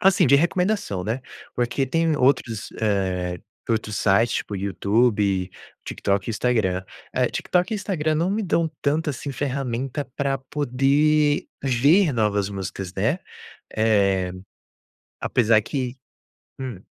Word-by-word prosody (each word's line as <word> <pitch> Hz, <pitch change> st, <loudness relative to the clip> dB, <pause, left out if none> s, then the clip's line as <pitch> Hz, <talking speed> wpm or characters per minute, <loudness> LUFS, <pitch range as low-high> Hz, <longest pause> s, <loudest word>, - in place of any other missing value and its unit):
assim 195 Hz, -5 st, +5 dB
de 140 Hz, -, +5 dB
recomendação, 180 Hz, -, 0 dB
né. 110 Hz, +7 st, -2 dB, 0.3 s
Porque 120 Hz, +3 st, 0 dB
tem 165 Hz, +3 st, +1 dB
outros, 125 Hz, -5 st, +1 dB
eh, 95 Hz, -4 st, 0 dB, 0.3 s
outros 110 Hz, -2 st, -1 dB
sites 110 Hz, +4 st, +3 dB
tipo 105 Hz, -, -4 dB
YouTube, 100 Hz, 0 st, +1 dB, 0.3 s
TikTok 100 Hz, +1 st, -1 dB
e -, -, 0 dB
Instagram, 105 Hz, -5 st, 0 dB, 0.3 s
eh, -, -, +2 dB
TikTok 180 Hz, +3 st, 0 dB
e -, -, +1 dB
Instagram 165 Hz, -6 st, -1 dB
não 170 Hz, +4 st, +1 dB
me 215 Hz, +2 st, 0 dB
dão 170 Hz, -3 st, +1 dB
tanto 155 Hz, +2 st, +1 dB
assim 140 Hz, 0 st, -4 dB
ferramenta 135 Hz, 0 st, -2 dB
para 140 Hz, -1 st, 0 dB
poder 145 Hz, +3 st, +2 dB, 0.2 s
ver 145 Hz, +7 st, +4 dB
novas 105 Hz, -4 st, +1 dB
músicas, 95 Hz, -2 st, -5 dB
né, 110 Hz, -, 0 dB, 0.6 s
eh, 100 Hz, -4 st, +2 dB, 0.9 s
apesar 115 Hz, -3 st, +3 dB
que 130 Hz, +2 st, -3 dB, 0.6 s
hum. 125 Hz, -8 st, -5 dB
125 Hz, 125 wpm, -23 LUFS, 100-150 Hz, 0.9 s, assim